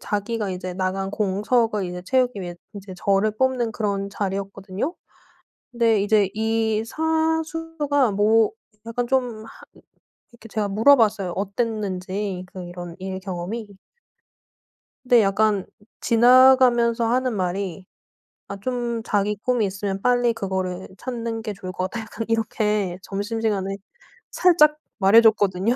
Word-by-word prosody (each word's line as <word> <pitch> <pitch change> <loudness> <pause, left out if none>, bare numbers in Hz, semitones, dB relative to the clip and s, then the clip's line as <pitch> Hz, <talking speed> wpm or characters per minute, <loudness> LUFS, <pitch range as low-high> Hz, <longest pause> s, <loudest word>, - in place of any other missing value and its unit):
자기가 210 0 -2
이제 185 0 -5
나간 190 +1 -2
공석을 210 +1 0
이제 180 0 -5
채우기 250 0 +1
위해 175 -1 -6 0.2
인제 195 -2 -9
저를 200 +3 +1
뽑는 255 -2 +1
그런 200 -2 -2
자리였거든요. 195 - -4 0.8
근데 230 -4 +2
이제 205 -1 +3
이 220 0 0
사수가 320 -2 0
뭐 215 +3 +3 0.4
약간 240 +1 -2
좀 245 -4 -1
하 - - -12 0.8
이렇게 230 -1 -14
제가 210 -1 -2
물어봤어요, 215 -4 +3
어땠는지 195 -2 -3
그 185 - -7
이런 175 0 -8
일 190 0 -5
경험이. 190 +4 -5 1.3
근데 245 -2 +5
약간 205 0 +1 0.3
지나가면서 240 -1 +5
하는 250 0 +1
말이 185 -1 -3 0.6
아 200 - -5
좀 240 -1 -2
"자기 205 0 0
꿈이 245 -4 +1
있으면 195 0 -4
빨리 245 -1 +3
그거를 190 -3 -3
찾는 230 -3 -4
게 215 -1 -4
좋을 185 -2 -8
것 185 +1 -3
같다." 230 - -5
약간 225 0 -6
이렇게 210 -4 0
점심시간에 205 -1 -2 0.6
살짝 305 -4 +4 0.2
말해줬거든요. 210 0 +4
215 Hz, 275 characters per minute, -23 LUFS, 195-235 Hz, 1.3 s, 근데